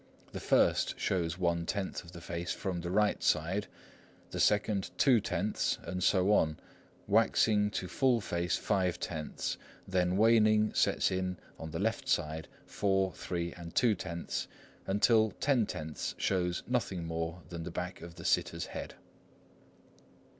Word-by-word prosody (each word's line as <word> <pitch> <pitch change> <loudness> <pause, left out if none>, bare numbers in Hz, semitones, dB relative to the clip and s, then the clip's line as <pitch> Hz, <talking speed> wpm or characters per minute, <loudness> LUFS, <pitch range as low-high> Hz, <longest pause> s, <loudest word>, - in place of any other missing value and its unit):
The - - -5
first - - +2
shows 85 -2 0
one 85 -2 0
tenth 100 -2 -2
of 85 - -13
the 85 -1 -10
face 85 +1 -4
from 90 -3 -3
the 85 - -4
right 105 +3 +2
side, 95 +7 +1 0.6
the - - -4
second 105 -1 +2
two 130 -5 +5
tenths, - - -1
and 90 0 -3
so 95 +1 +4
on, 80 -6 +2 0.5
waxing 105 -2 +3
to 95 -3 -3
full 130 +3 +2
face 85 -4 -1
five 95 -4 0
tenths; 80 -3 -4 0.3
then 90 -1 +1
waning 110 -1 +4
sets - - +2
in 95 -1 -1 0.2
on 80 - -6
the 80 - -4
left 115 +7 -1
side, 80 - 0 0.2
four, 95 -2 +1
three, 85 -1 -3
and 85 -2 -10
two 115 -3 +4
tenths, 85 -3 -4 0.4
until 110 +1 +3
ten 130 -7 +2
tenths 75 0 -4
shows 90 -2 0
nothing 100 -9 -1
more 80 +1 -4
than 85 -2 -6
the 85 - -5
back 90 +2 -5
of 85 -1 -9
the 85 - -10
sitter's - - +1
head. - - -6
90 Hz, 150 wpm, -32 LUFS, 85-105 Hz, 0.6 s, two